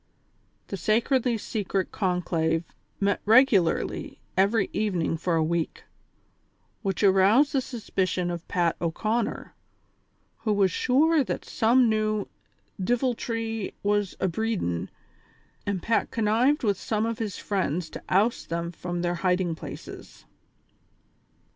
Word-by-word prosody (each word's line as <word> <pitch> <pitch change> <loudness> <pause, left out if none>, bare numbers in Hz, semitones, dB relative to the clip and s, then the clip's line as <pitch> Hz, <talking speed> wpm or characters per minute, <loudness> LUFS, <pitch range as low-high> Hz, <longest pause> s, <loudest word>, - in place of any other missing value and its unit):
The 195 - -3
sacredly 235 - +2
secret 200 -3 -2
conclave 170 -4 0 0.4
met 200 0 +1
regularly 220 -6 +3 0.2
every 200 +2 +3
evening 185 -7 0
for 170 +1 -1
a 160 - +2
week, 165 0 -2 1.0
which 195 -2 -2
aroused 200 +9 +5
the 270 - +2
suspicion 185 -7 -2
of 170 0 -6
Pat 175 -2 +1
O'Conner, 215 +7 -2 0.9
who 220 -2 0
was 195 -2 +3
sure 295 - +3
that - - -4
some 240 +2 +3
new 215 -1 0 0.6
"diviltry 230 -2 -1
was 205 -1 +1
abreedin'," 185 - -1 0.8
and 195 -4 -2
Pat 230 - +1
connived 235 +7 +2
with 205 -4 +1
some 215 0 -1
of 230 0 -3
his 215 -4 -3
friends 180 -4 -1
to - - -7
oust 210 +6 +1
them 170 0 -2
from 175 0 -4
their 175 0 +1
hiding 180 -2 +1
places. 160 - -10
205 Hz, 115 wpm, -26 LUFS, 180-230 Hz, 1.0 s, aroused